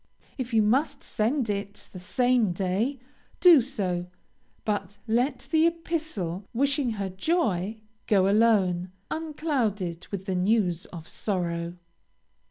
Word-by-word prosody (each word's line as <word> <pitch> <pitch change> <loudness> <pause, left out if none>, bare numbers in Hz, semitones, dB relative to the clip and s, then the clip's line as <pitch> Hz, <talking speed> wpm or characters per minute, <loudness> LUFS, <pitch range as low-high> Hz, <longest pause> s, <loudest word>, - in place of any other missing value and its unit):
If 255 -2 -4
you 220 -2 +4
must 275 +6 +1
send 240 +4 0
it 200 -1 -4
the 185 - -7
same 240 +1 +2
day, 195 +9 0 0.4
do 340 -6 +8
so, 190 -9 -2 0.6
but 205 -2 -2
let 245 +4 0
the 320 0 +5
epistle 315 - -3
wishing 275 -1 +1
her 200 -2 -3
joy, 210 - 0 0.3
go 195 -3 +4
alone, 195 -4 +3 0.2
unclouded 250 - -2
with 195 -2 -5
the 190 - -1
news 185 -2 +1
of 165 -2 -10
sorrow. 170 -3 -2
210 Hz, 120 wpm, -27 LUFS, 185-265 Hz, 0.6 s, do